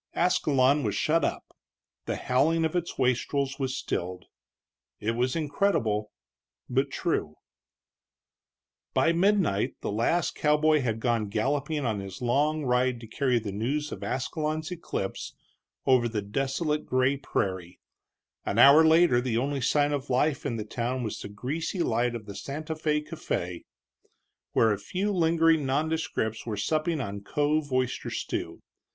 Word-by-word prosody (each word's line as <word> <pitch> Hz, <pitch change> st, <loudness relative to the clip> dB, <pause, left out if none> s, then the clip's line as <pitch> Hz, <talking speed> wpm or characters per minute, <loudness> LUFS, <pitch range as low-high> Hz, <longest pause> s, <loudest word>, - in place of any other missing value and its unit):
Ascalon 145 Hz, -5 st, +3 dB
was -, -, -1 dB
shut 165 Hz, +2 st, +2 dB
up; -, -, -3 dB, 0.5 s
the -, -, -1 dB
howling 160 Hz, +6 st, +2 dB
of 160 Hz, -, -2 dB
its 175 Hz, -1 st, -2 dB
wastrels 135 Hz, +2 st, 0 dB
was 135 Hz, -1 st, -1 dB
stilled. 90 Hz, -5 st, -4 dB, 0.7 s
It 110 Hz, -, -1 dB
was 125 Hz, +2 st, 0 dB
incredible, 145 Hz, -, 0 dB, 0.6 s
but 135 Hz, +3 st, +1 dB
true. 130 Hz, -, -2 dB, 1.6 s
By 165 Hz, -, +4 dB
midnight 180 Hz, -, +2 dB
the -, -, -3 dB
last 120 Hz, +11 st, +1 dB
cowboy 150 Hz, 0 st, +3 dB
had 115 Hz, -3 st, -1 dB
gone 115 Hz, -4 st, 0 dB
galloping 140 Hz, +6 st, -1 dB
on 110 Hz, -4 st, -1 dB
his 95 Hz, -1 st, -7 dB
long 145 Hz, +5 st, +1 dB
ride 125 Hz, 0 st, +1 dB
to -, -, -8 dB
carry 125 Hz, +1 st, +1 dB
the 110 Hz, -3 st, -3 dB
news 140 Hz, +9 st, -2 dB
of -, -, -6 dB
Ascalon's 155 Hz, +5 st, -2 dB
eclipse 160 Hz, -, -4 dB, 0.5 s
over 125 Hz, -3 st, +4 dB
the 105 Hz, -3 st, -2 dB
desolate 135 Hz, -, -1 dB
gray 130 Hz, +2 st, +2 dB
prairie; 95 Hz, -10 st, -3 dB, 0.6 s
an 100 Hz, -, -2 dB
hour 140 Hz, +6 st, +8 dB
later 160 Hz, -5 st, +5 dB
the 120 Hz, -3 st, -1 dB
only 140 Hz, +2 st, -1 dB
sign 145 Hz, +3 st, +2 dB
of 140 Hz, -1 st, -3 dB
life 135 Hz, +2 st, +1 dB
in 115 Hz, -, -2 dB
the 110 Hz, -2 st, -4 dB
town 125 Hz, +3 st, -2 dB
was 110 Hz, -, -4 dB
the -, -, -7 dB
greasy 150 Hz, -, -3 dB
light 120 Hz, -1 st, 0 dB
of 110 Hz, -3 st, -7 dB
the 100 Hz, -, -8 dB
Santa 145 Hz, +10 st, -5 dB
Fé 150 Hz, -1 st, -1 dB
café, 90 Hz, -, -4 dB, 0.9 s
where 110 Hz, -, +4 dB
a 100 Hz, -, -1 dB
few 200 Hz, +3 st, -2 dB
lingering 165 Hz, -3 st, +3 dB
nondescripts 140 Hz, -6 st, -1 dB
were 110 Hz, -3 st, -4 dB
supping 155 Hz, -, 0 dB
on 100 Hz, -5 st, -4 dB
cove 145 Hz, +6 st, 0 dB
oyster 130 Hz, -1 st, -1 dB
stew. -, -, -4 dB
135 Hz, 145 wpm, -27 LUFS, 115-155 Hz, 1.6 s, hour